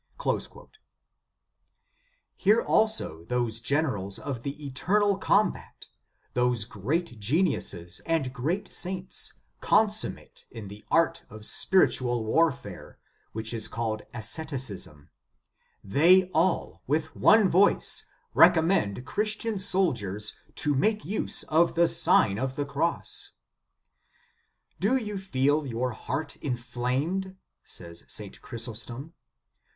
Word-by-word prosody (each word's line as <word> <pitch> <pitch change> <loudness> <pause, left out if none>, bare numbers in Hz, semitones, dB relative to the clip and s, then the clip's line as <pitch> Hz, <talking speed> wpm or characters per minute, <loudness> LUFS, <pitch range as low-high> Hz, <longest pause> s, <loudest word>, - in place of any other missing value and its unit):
"* - - -3 1.9
Hear 210 +3 +4
also 215 - +2
those 115 0 -2
generals 115 -8 -1
of 130 -5 -5
the 145 +3 -6
eternal 195 +9 +1
combat, 210 +2 0 0.4
those 125 -3 +1
great 125 - -3
geniuses 105 - 0
and 155 -6 0
great 170 +10 -3
saints, 185 0 -3 0.3
consummate 215 -1 0
in 110 -4 -9
the 105 +1 -12
art 165 0 +2
of 110 0 -9
spiritual 120 - +2
warfare, 125 - -1 0.4
which 110 +1 -3
is 110 -2 0
called 110 -2 -3
asceticism; 115 - -3 0.7
they 180 - +4
all, 170 +2 0
with 155 +3 -1
one 215 -2 +5
voice, 190 +3 +3 0.3
recommend 160 - +4
Christian 215 - -1
soldiers 120 - 0 0.2
to 150 - 0
make 210 +9 +1
use 210 - +2
of 165 +2 +2
the 170 0 +4
Sign 165 - +5
of 130 0 -2
the 145 - -2
Cross. 155 +4 -2 1.5
"Do 215 +8 +2
you 210 -5 -4
feel 145 -4 0
your 125 +1 -2
heart 145 +6 -5
inflamed?" 130 +9 -3 0.3
says 85 0 -9
St. - - -5
Chrysostom. 120 +6 -6
140 Hz, 105 wpm, -27 LUFS, 115-185 Hz, 1.9 s, one